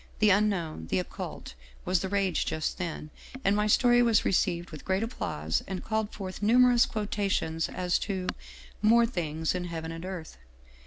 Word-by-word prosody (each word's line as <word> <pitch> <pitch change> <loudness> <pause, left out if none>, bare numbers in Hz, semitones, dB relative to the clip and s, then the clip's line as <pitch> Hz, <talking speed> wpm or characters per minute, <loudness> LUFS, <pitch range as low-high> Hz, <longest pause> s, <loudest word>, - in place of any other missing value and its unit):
The 215 -1 +4
Unknown, 185 - 0
the 95 - 0
Occult, 90 - -5 0.3
was 185 0 +2
the 190 - -3
rage 195 -4 0
just 155 - -2
then, 165 -3 -5 0.3
and 195 +1 +3
my 210 0 +1
story 240 +2 +5
was 230 -3 +3
received 175 -2 +1
with 155 - -9
great 190 +3 0
applause 80 - -2
and 190 -2 -4
called 220 -1 -1
forth 190 -1 -7
numerous 245 +2 +5
quotations 200 -6 -1
as 180 -1 0
to 190 -3 -3 0.3
' - - -20
more 235 0 +6
things 160 -8 -2
in 180 -1 -3
heaven 165 -1 -5
and 165 +1 -7
earth.' 180 - -7
190 Hz, 170 wpm, -28 LUFS, 165-210 Hz, 0.3 s, more